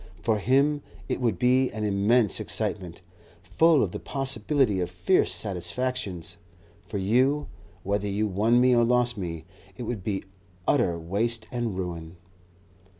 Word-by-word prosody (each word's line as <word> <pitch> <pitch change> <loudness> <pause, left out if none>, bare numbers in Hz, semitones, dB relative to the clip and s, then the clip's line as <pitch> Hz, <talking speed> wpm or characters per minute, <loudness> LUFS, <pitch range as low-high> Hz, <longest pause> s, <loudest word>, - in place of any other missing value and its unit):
For 110 -2 +1
him, 140 +6 +2 0.3
it - - -2
would 115 -7 +1
be 130 +4 +3
an 110 0 -5
immense 105 +2 +2
excitement, 90 -3 -3 0.4
full 150 - +4
of 90 - -2
the - - -5
possibility 135 -4 0
of 90 - -1
fierce 90 0 +2
satisfactions; 95 -2 -2 0.5
for 100 +2 -5
you, 130 +9 +2 0.4
whether 100 +1 -1
you 100 +2 0
won 105 +4 +2
me 125 0 +5
or 120 - +4
lost 120 0 +2
me, 85 -5 -5 0.3
it 125 - -5
would 110 -4 -4
be 100 -1 -2 0.4
utter 85 -2 +2
waste 110 +7 -2
and 120 -6 -2
ruin." 85 -2 -5
105 Hz, 145 wpm, -26 LUFS, 95-125 Hz, 0.5 s, me